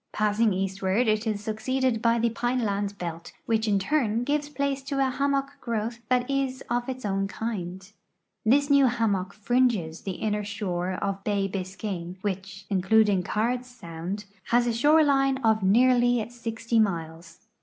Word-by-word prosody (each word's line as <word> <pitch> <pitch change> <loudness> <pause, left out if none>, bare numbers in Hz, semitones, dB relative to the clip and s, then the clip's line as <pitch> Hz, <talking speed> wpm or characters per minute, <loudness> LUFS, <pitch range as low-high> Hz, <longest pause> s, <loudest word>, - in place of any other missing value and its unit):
ssing 215 +1 +2
eastward 195 +4 0
it 215 +1 +1
is 210 -1 -2
succeeded 230 +2 -1
by 230 0 +3
the 230 0 0
})ine 245 0 +1
land 200 0 -2
belt, 170 -2 -6
which 225 -1 +1
in 205 -2 +3
turn 230 +1 +1
gives 290 +2 -1
place 280 -1 -1
to 275 +1 -4
a 270 -1 +2
hammock 275 +1 0
growth 230 0 -3
that 250 -1 +2
is 270 -1 -1
of 245 +1 0
its 255 -3 -5
own 195 -1 0
kind. 190 -3 -5 0.5
This 280 +6 +4
new 280 -2 +6
hammock 205 -6 0
fringes 215 -7 0
the 195 - -4
inner 210 +2 -2
shore 190 -3 -3
of 195 +1 -3
bay 200 -2 0
Bisca\me, 185 -2 -5
which, 195 -1 -4
including 200 +1 +3
Cards 240 +6 -1
sound, 190 -3 -6 0.2
has 240 +1 +3
a 240 - 0
shore 295 +7 +5
line 270 -2 +3
of 220 -1 +3
nearly 245 +3 +4
60 230 -1 -2
miles. 165 -3 -2
220 Hz, 160 wpm, -26 LUFS, 195-250 Hz, 0.5 s, new